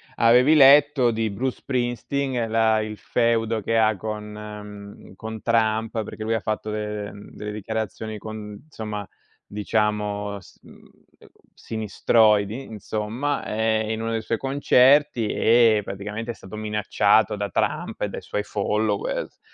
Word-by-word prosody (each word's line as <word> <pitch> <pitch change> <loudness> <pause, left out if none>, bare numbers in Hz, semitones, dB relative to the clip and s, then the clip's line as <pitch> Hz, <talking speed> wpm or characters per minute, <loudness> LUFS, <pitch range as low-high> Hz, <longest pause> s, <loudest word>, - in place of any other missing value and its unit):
avevi 125 +5 +5
letto 140 -2 +6
di 110 -1 -1
Bruce 125 +6 -2
Springsteen 125 -1 -2
la 110 -1 +3
il 110 0 -5
feudo 115 -1 0
che 115 +3 0
ha 110 -1 +3
con 105 +1 -5
mhmm, 105 -2 -10
con 110 +1 -7
Trump, 110 -1 +1
perché 110 - -9
lui 115 +1 0
ha - - 0
fatto 110 0 -3
de 105 -1 -4
mhmm, 100 +1 -12
delle 105 0 -6
dichiarazioni 110 +1 -4
con 105 -1 -8
insomma, 105 -6 -6 0.4
diciamo, 105 -1 -1
s 95 - -19
mhmm, - - -15 0.5
uhm, - - -18 0.3
sinistroidi, 110 +1 +1
insomma, 110 +6 -3
ehm, 110 0 0
in 110 0 -3
uno 115 0 -2
dei 115 -1 -1
suoi 115 - -1
concerti 135 -2 +3
e 115 0 +4
praticamente 105 +4 -5
è - - -7
stato 95 -2 -11
minacciato 105 0 +2
da 100 0 -3
Trump - - -2
e - - 0
dai - - -6
suoi 105 - -3
followers. 105 0 -2
110 Hz, 145 wpm, -24 LUFS, 105-115 Hz, 0.5 s, letto